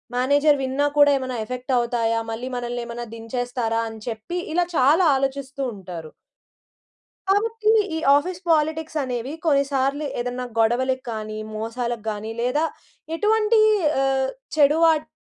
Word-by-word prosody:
Manager 285 Hz, +4 st, +3 dB
విన్నా 265 Hz, +2 st, +1 dB
కూడా, 290 Hz, 0 st, +7 dB
ఎమెనా 260 Hz, -1 st, -4 dB
ఎఫెక్టవుతాయా, 240 Hz, -2 st, 0 dB
మళ్ళీ 240 Hz, +3 st, -4 dB
మనల్నేమనా 240 Hz, 0 st, -4 dB
దించేస్తారా, 230 Hz, 0 st, -2 dB
అని 220 Hz, -1 st, -10 dB
చెప్పి, 230 Hz, +10 st, -4 dB, 0.2 s
ఇలా 350 Hz, +1 st, +2 dB
చాలా 300 Hz, +8 st, +5 dB
ఆలోచిస్తూ 270 Hz, 0 st, -3 dB
ఉంటారు. 175 Hz, -5 st, -8 dB, 1.2 s
కాబట్టి, 435 Hz, +2 st, +2 dB, 0.2 s
ఈ -, -, -1 dB, 0.2 s
ఆఫీస్ 345 Hz, +5 st, -1 dB
పాలిటిక్సనేవి, 300 Hz, -5 st, -1 dB
కొన్నిసార్లు 280 Hz, -1 st, +1 dB
ఏదన్నా 245 Hz, +1 st, -3 dB
గొడవలకి 255 Hz, +3 st, +1 dB
గాని, 215 Hz, -1 st, -5 dB, 0.2 s
మోసాలకి 230 Hz, +1 st, -4 dB
గాని, 215 Hz, +1 st, -5 dB
లేదా 250 Hz, +6 st, +1 dB, 0.5 s
ఎటువంటి 435 Hz, +2 st, +3 dB, 0.4 s
ఆహ్, 265 Hz, 0 st, +1 dB, 0.3 s
చెడు 295 Hz, +1 st, +5 dB
వాట్ 315 Hz, -2 st, +3 dB
260 Hz, 115 wpm, -23 LUFS, 235-295 Hz, 1.2 s, కూడా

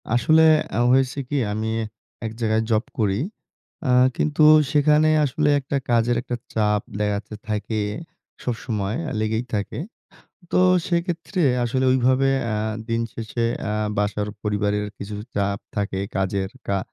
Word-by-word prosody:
আসলে 155 Hz, +7 st, +5 dB, 0.3 s
আ -, -, +2 dB
হয়েছে 130 Hz, +1 st, +2 dB
কি? 145 Hz, -, 0 dB
আমি 110 Hz, +1 st, -2 dB, 0.6 s
এক 110 Hz, -, -3 dB
জায়গায় 110 Hz, 0 st, +2 dB
জব 110 Hz, 0 st, +2 dB, 0.2 s
করি। 100 Hz, -1 st, +1 dB, 0.7 s
আ -, -, +1 dB, 0.3 s
কিন্তু 155 Hz, 0 st, +2 dB, 0.3 s
সেখানে 150 Hz, +1 st, +4 dB, 0.2 s
আসলে 145 Hz, +2 st, +1 dB
একটা 140 Hz, +1 st, -2 dB
কাজের 120 Hz, 0 st, +3 dB
একটা 125 Hz, -1 st, -4 dB, 0.2 s
চাপ 105 Hz, -2 st, +2 dB, 0.2 s
দেখা 105 Hz, -1 st, +1 dB
যাচ্ছে 105 Hz, +1 st, -6 dB
থাকে 105 Hz, +1 st, -2 dB, 0.6 s
সবসময় 110 Hz, -4 st, -2 dB
অ্যা -, -, -4 dB
লেগেই 110 Hz, +2 st, 0 dB
থাকে। 105 Hz, +4 st, -2 dB, 0.7 s
তো -, -, +4 dB, 0.3 s
সেক্ষেত্রে 175 Hz, +1 st, -1 dB, 0.2 s
আসলে 130 Hz, +2 st, 0 dB
ঐভাবে 130 Hz, +1 st, +3 dB, 0.2 s
আ -, -, 0 dB, 0.3 s
দিনশেষে 115 Hz, 0 st, -2 dB, 0.3 s
আ -, -, 0 dB, 0.3 s
বাসার 105 Hz, 0 st, -1 dB
পরিবারের 105 Hz, 0 st, 0 dB
কিছু 100 Hz, +1 st, -6 dB, 0.2 s
চাপ 100 Hz, 0 st, 0 dB, 0.2 s
থাকে 100 Hz, -2 st, -1 dB, 0.2 s
কাজের 95 Hz, 0 st, -1 dB, 0.2 s
কা 100 Hz, -, +1 dB
110 Hz, 135 wpm, -23 LUFS, 105-130 Hz, 0.7 s, আসলে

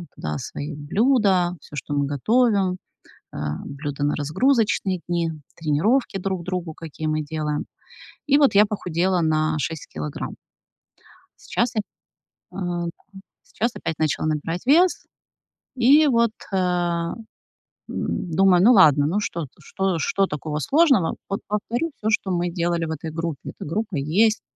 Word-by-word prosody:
туда 75 Hz, -1 st, -4 dB
свои 145 Hz, -, -6 dB
блюда, 190 Hz, -, +2 dB
всё, -, -, -12 dB
что 145 Hz, -, -4 dB
мы 145 Hz, 0 st, +1 dB
готовим, 200 Hz, -, +2 dB, 0.6 s
а, 75 Hz, 0 st, -3 dB
блюда 145 Hz, 0 st, -4 dB
на 145 Hz, -, +1 dB
разгрузочные 190 Hz, -, +1 dB
дни, 170 Hz, -1 st, 0 dB, 0.3 s
тренировки 195 Hz, -, +1 dB
друг 190 Hz, -1 st, -2 dB
другу, 180 Hz, -3 st, -4 dB
какие 160 Hz, -1 st, -7 dB
мы 155 Hz, 0 st, 0 dB
делаем. 150 Hz, 0 st, -3 dB, 0.6 s
И 280 Hz, -1 st, +5 dB
вот 285 Hz, -6 st, +4 dB
я 205 Hz, +2 st, +7 dB
похудела 180 Hz, -2 st, 0 dB
на 155 Hz, -1 st, +1 dB
6 160 Hz, +1 st, -4 dB
килограмм. 75 Hz, -1 st, -5 dB, 1.1 s
Сейчас 240 Hz, +1 st, 0 dB
я 215 Hz, -, +2 dB, 0.7 s
а, 175 Hz, -2 st, -3 dB, 0.6 s
сейчас 235 Hz, -, -2 dB
опять 160 Hz, -, -4 dB
начала 155 Hz, -1 st, 0 dB
набирать 155 Hz, +3 st, -2 dB
вес, 340 Hz, +7 st, +4 dB, 0.7 s
и 275 Hz, +5 st, +6 dB
вот, 235 Hz, -4 st, +3 dB, 0.2 s
а, 175 Hz, -3 st, 0 dB, 0.8 s
м, 180 Hz, -, -3 dB
думаю: 190 Hz, -2 st, +5 dB
"Ну, 235 Hz, +6 st, +7 dB
ладно, 150 Hz, -, +6 dB
ну, 185 Hz, +7 st, 0 dB
что 170 Hz, -6 st, -3 dB
что 190 Hz, -3 st, -1 dB
что 195 Hz, +5 st, +1 dB
такого 150 Hz, -2 st, -4 dB
сложного? 270 Hz, -, +3 dB
Вот 195 Hz, -, -2 dB
повторю 230 Hz, +9 st, -2 dB
всё, 215 Hz, -, -3 dB
что 205 Hz, -3 st, 0 dB
мы 175 Hz, -1 st, 0 dB
делали 170 Hz, -1 st, -1 dB
в -, -, -5 dB
этой 160 Hz, +1 st, -5 dB
группе". 165 Hz, -2 st, -4 dB
Эта -, -, -9 dB
группа 205 Hz, +2 st, -2 dB
есть, 195 Hz, +11 st, +2 dB
175 Hz, 140 wpm, -23 LUFS, 155-210 Hz, 1.1 s, я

